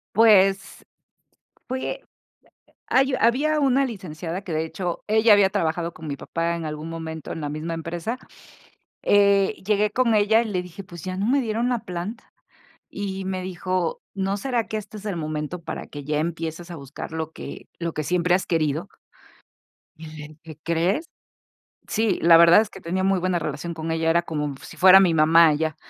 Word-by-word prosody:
Pues, 195 -3 +4 0.8
fui 260 +1 -3
eh, - - -4 0.9
hay 265 +1 +3
había 290 +7 +2
una 275 -1 +3
licenciada 180 -6 -6
que, 185 -4 -6
de 155 +1 0
hecho, 175 +1 -4
ella 220 +1 +5
había 200 -2 +5
trabajado 170 -3 -1
con 160 - -10
mi 140 - -3
papá 170 +3 -2
en 165 -1 -5
algún 155 +1 -5
momento 160 -1 -6
en 160 - -5
la 145 - -3
misma 155 +3 -4
empresa, 170 +8 -4 0.9
eh, 200 -1 +4
llegué 210 0 +2
con 235 0 +2
ella 215 +2 +4
y - - -3
le 185 -3 -1
dije: 180 +2 -10
"Pues, 175 -4 -11
ya 185 0 -4
no 195 - -1
me 275 +3 +3
dieron 230 +1 -1
la 245 -2 0
planta". 200 +2 -7 0.6
Y 195 -1 -5
me 190 -1 -3
dijo: 185 -1 -2
"¿No 195 0 -1
será 240 0 -1
que 215 - -3
este 215 0 -8
es 210 - -11
el 205 -3 -2
momento 155 +2 -4
para - - -6
que 145 -1 -8
ya 150 +1 0
empieces 165 +1 -4
a - - -6
buscar 140 +1 -8
lo 160 -1 -4
que - - -9
lo 170 -1 -3
que 155 - -3
siempre 180 +2 +2
has 190 - -1
querido?" 160 +1 0 1.1
Y 160 - -10
le 150 -1 -8 0.2
dije: 155 -2 -11
"¿Crees?", 175 - 0 0.8
sí, 220 -1 0
la 165 0 +7
verdad 170 +4 +7
es 220 - -4
que - - -12
tenía 185 +3 -2
muy 195 -1 +2
buena 180 -1 0
relación 155 +2 -4
con 160 0 -4
ella, 160 0 0
era 170 +1 +3
como 150 -3 -3
mm 140 - -6
si - - -12
fuera 185 +1 +8
mi 185 -3 +4
mamá 160 +1 +6
ella, 155 0 -1
180 Hz, 190 wpm, -24 LUFS, 160-205 Hz, 1.1 s, fuera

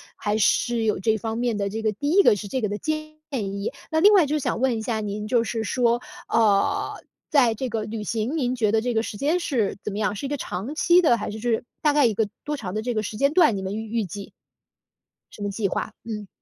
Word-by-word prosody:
还 210 +1 -1
是 230 +2 +2
有 210 -4 +1
这 220 +2 +1
方 225 +2 -4
面 240 -3 0
的 200 -1 -1
这 220 +2 -4
个 220 - +1
第 285 +9 -2
一 400 +3 +6
个 - - +6
是 205 - -6
这 255 +5 -2
个 215 - 0
的 205 - -3
建 310 +2 -2 0.3
议。 200 0 -3 0.2
那 315 - +2
另 410 +5 +7
外 375 -6 +6
就 300 +1 0
想 250 - -2
问 255 -4 +2
一 - - -3
下 220 -1 -2
您， 210 +1 -4
就 235 0 +2
是 225 -1 -3
说， 240 0 +1 0.3
呃， 210 -3 +2 0.4
在 250 -6 +4
这 255 +4 -3
个 225 -2 -2
旅 215 0 -5
行， 230 +8 -1
您 250 -3 0
觉 215 -4 +1
得 220 - +3
这 245 +1 -1
个 220 0 +1
时 205 - -6
间 305 - +1
是 240 -11 0
怎 210 - -3
么 200 - -5
样？ 210 -1 0
是 240 - -5
一 275 - -3
个 290 - -2
长 215 +6 -5
期 350 +3 +5
的 240 -8 +4
还 210 - -4
是 215 +1 -6
就 240 - -1
是 225 - 0 0.2
大 300 - +4
概 290 -2 +4
一 225 - +3
个 210 0 0 0.2
多 295 0 -1
长 195 -8 -6
的 215 - -1
这 245 +1 -2
个 215 - -1
时 210 0 -5
间 280 +3 +2
段， 310 - +5
你 - - -4
们 190 +2 -4
预 220 0 -5
预 210 - -1
计？ 200 +3 -8 1.0
什 - - -12
么 205 - -1
计 200 0 -1
划， - - -3
嗯。 210 -3 -6
225 Hz, 290 characters per minute, -24 LUFS, 210-260 Hz, 1.0 s, 另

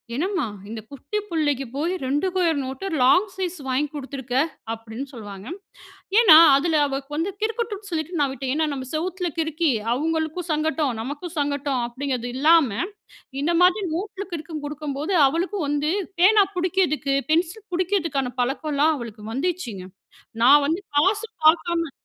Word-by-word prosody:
"என்னம்மா? 365 +3 -1 0.2
இந்த 225 0 -5
குட்டி 280 +8 -5
புள்ளைக்கு 290 -5 0
போய் 330 +6 -1
2 285 +7 0
கொயர் 340 -4 +2
நோட்டு, 265 +7 -6 0.2
லாங் 280 +11 +5
சைஸ் 370 -2 -3
வாங்கி 265 +3 +1
குடுத்துருக்க." 265 -3 -5 0.4
அப்படீன்னு 225 +3 -7
சொல்வாங்க. 205 -3 -9 0.7
ஏன்னா, 345 -10 +9 0.2
அதுல 310 +2 +2
அவ 270 0 -2 0.2
வந்து 335 +6 -1
கிறுக்கட்டும்னு 435 -2 -3
சொல்லிட்டு 330 +1 -3
நா - - +4
விட்டேன். 265 0 -3
ஏன்னா, 315 0 +1
"நாம 260 -2 -5
செவுத்துல 360 +2 -2
கிறுக்கி 320 -1 +1 0.2
அவுங்களுக்கும் 320 +4 -2
சங்கட்டம், 310 -3 0
நமக்கும் 290 +8 -6
சங்கட்டம்." 285 -3 -1
அப்படீங்குறது 255 -1 -3
இல்லாம, 315 -1 +5 0.7
இந்த 340 +4 +1
மாதிரி 370 +3 +4
நோட்டுல 395 +2 -4
கிறுக்கங் 315 -2 -5
குடுக்கும்போது, 295 +3 -3
அவளுக்கும் 340 +3 -2
வந்து 295 +1 0 0.3
பேனா 410 +3 +6
புடிக்கதுக்கு, 350 -6 +1 0.2
பென்சில் 355 +6 0
புடிக்கதுக்கான 330 -8 0
பழக்கலாம் 295 +4 +1
அவளுக்கு 225 -3 -8
வந்திருச்சுங்க. 265 - -3 0.6
நான் 285 +3 +7
வந்து 330 +6 -1
காசு 395 +9 +3 0.2
பாக்காம 335 0 +3
310 Hz, 135 wpm, -23 LUFS, 275-355 Hz, 0.7 s, ஏன்னா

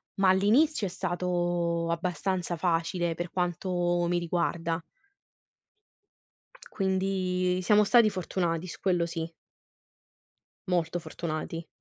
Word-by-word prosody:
ma 195 -1 +3
all'inizio 215 +7 +3
è - - -5
stato 175 -2 -1
abbastanza 175 +1 -1
facile, 170 0 0
per 175 +1 -5
quanto 175 -1 0
mi 175 0 +2
riguarda. 170 -1 -1 1.9
Quindi 185 -1 0
siamo 210 +3 +5
stati 225 +1 +5
fortunati, 180 -2 -2
su - - -8
quello 175 -3 +2
sì. 165 -1 -4 1.4
Molto 175 -1 0
fortunati. 165 0 -5
175 Hz, 95 wpm, -28 LUFS, 170-185 Hz, 1.9 s, siamo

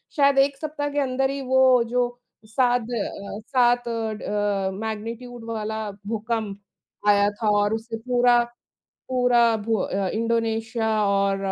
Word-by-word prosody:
शायद 280 -2 +4
1 275 0 +3
सप्ताह 295 0 -3
के 290 0 -1
अंदर 265 0 0
ही 275 0 -3
वो 260 -1 +5
जो 245 +1 +1 0.4
साद 245 +1 +1
अ, 205 -3 -4
7 245 -1 +3
ड 210 -3 -1
मैग्नीट्यूड 230 +2 -5
वाला 220 -1 -3 0.2
भूकंप 220 -2 -3 0.5
आया 205 0 +5
था 215 - +2
और 205 +1 +1
उससे 225 +1 -4
पूरा, 245 0 +3 0.7
पूरा 245 -2 +3
भू 220 +1 -1
अ, 195 0 -1
इंडोनेशिया 225 0 -1 0.2
और 200 0 +2
230 Hz, 130 wpm, -24 LUFS, 215-250 Hz, 0.7 s, वो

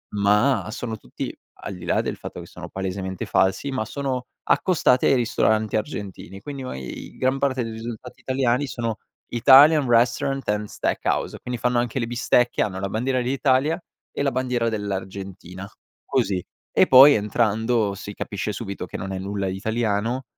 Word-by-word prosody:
ma 105 +1 +3
sono 110 0 -4
tutti 60 - -7 0.3
al 100 - -5
di 90 -1 -10
là - - +2
del - - -4
fatto - - -8
che - - -8
sono - - -10
palesemente 95 -1 -4
falsi, 95 +9 +1
ma 130 -5 -1
sono 130 -1 -3 0.2
accostati 155 -8 +3
ai - - +5
ristoranti 110 -3 +1
argentini; 100 -3 -5
quindi 140 0 -7
ma 130 - -5
e 65 - -6
i - - -8
gran 130 +1 +1
parte 130 -3 0
dei 115 - -5
risultati 115 +2 -8
italiani 130 +1 0
sono 115 -3 -3 0.3
Italian 140 +4 +7
restaurant 125 +3 +2
and 105 0 0
steak - - -2
house, - - -1
quindi 125 -1 -5
fanno 125 -1 +1
anche 120 +1 -2
le 115 - -1
bistecche, 120 0 +2
hanno 95 -2 -1
la 100 - -3
bandiera 125 +5 0
dell'Italia 135 +5 +1 0.3
e - - -4
la 140 -1 +1
bandiera 125 -2 0
dell'Argentina, 95 -2 -5 0.4
così; 95 -2 0 0.3
e - - +5
poi, 135 +3 +9
entrando, 110 0 +1
si 100 +1 -8
capisce 100 +1 -4
subito 100 -2 -5
che - - -7
non 95 0 -5
è 95 - -3
nulla 100 0 -3
di 95 - -2
italiano 110 +3 -1
115 Hz, 175 wpm, -23 LUFS, 100-130 Hz, 0.4 s, poi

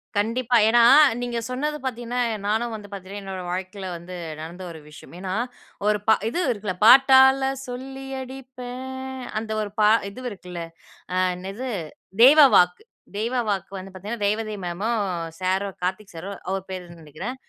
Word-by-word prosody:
கண்டிப்பா. 230 +4 +2
ஏன்னா? 235 +1 +5 0.4
நீங்க 240 -1 -2
சொன்னது 295 +4 -2
பாத்தீங்கனா, 245 -1 -3 0.3
நானும் 225 +2 0
வந்து 210 -2 -9
பாத்தீங்னா, 200 0 -7
என்னோட 190 -1 -5
வாழ்க்கைல 190 +1 -5
வந்து 175 +2 -9 0.3
நடந்த 170 +4 -8
ஒரு 160 - -10
விஷயம். 150 - -14
ஏன்னா 185 0 -4 0.5
ஒரு 210 0 +3
பா 220 - +7 0.2
இது 295 - -2
இருக்குல்ல. 205 -4 -3
"பாட்டால 265 +1 +7 0.2
சொல்லி 265 +2 -7 0.2
அடிப்பேன்" 255 -1 -8 0.5
அந்த 220 0 -6
ஒரு 205 -1 -4
பா 210 0 +6 0.2
இது 200 +6 -10
இருக்குல்ல. 180 -3 -8 0.5
அ - - -1 0.2
என்னது? 195 +8 -6 0.5
தெய்வ 285 +5 +9 0.2
வாக்கு. 180 0 +4 0.3
தெய்வ 230 +4 -1
வாக்கு 195 -2 -2
வந்து 190 +1 -10
பாத்தீங்கனா, 205 +4 -5
ரேவதி 215 +1 -1
மேமும் 205 +7 -1 0.4
சாரும், 190 +1 -1
கார்த்திக் 190 +2 -3
சாரும். 195 +4 -7
அவரு 195 -1 -2
பேருன்னு 175 -3 -8
நினைக்கிறேன். 165 - -6
210 Hz, 150 wpm, -24 LUFS, 185-245 Hz, 0.5 s, தெய்வ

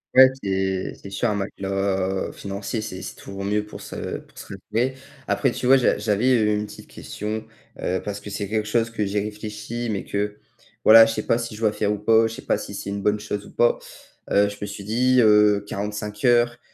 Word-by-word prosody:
Ouais, 130 0 +10 0.2
c'est 95 -1 -1
c'est 100 - -11
sûr. 95 - -1
Un - - +1
matelas 95 -1 -1
financier, 100 +3 -4
c'est 95 -3 -6
c'est - - -7
toujours 100 0 -8
mieux 105 +1 0
pour 105 - -10
se - - -5
pour - - -21
se - - -8 0.3
relever. 125 +4 +1 0.3
Après, 135 - +2
tu 125 - -5
vois, 130 +2 +7
j'a 130 - +3
j'avais 110 0 +2
une 105 0 -1
petite - - -12
question, 110 +1 -5 0.4
heu, 95 +1 0
parce 105 -1 -4
que 105 - -9
c'est 100 0 -4
quelque 110 +1 -1
chose 115 +1 +1
que 105 -3 -1
j'ai 100 +1 0
réfléchi, 105 +3 -5
mais 100 - -3
que, 105 +1 -2 0.5
voilà, 115 +1 +10
je 115 - -1
sais 110 - -3
pas 115 - +2
si 115 -2 -5
je 110 - -10
dois 110 - +3
faire 105 -1 0
ou 105 - -1
pas, 110 +2 +4
je 110 - -7
sais - - -9
pas - - +1
si - - -7
c'est 100 - -5
une 100 0 -3
bonne 105 +2 +1
chose 105 0 -4
ou - - -14
pas. - - +3 0.5
Heu, 100 0 +4
je 100 - -9
me 105 - -3
suis 100 0 -7
dit: 125 +5 +3
«Heu, 105 -1 +5
45 105 +2 -4
heures, 120 -1 +3
105 Hz, 225 wpm, -23 LUFS, 100-115 Hz, 0.5 s, Ouais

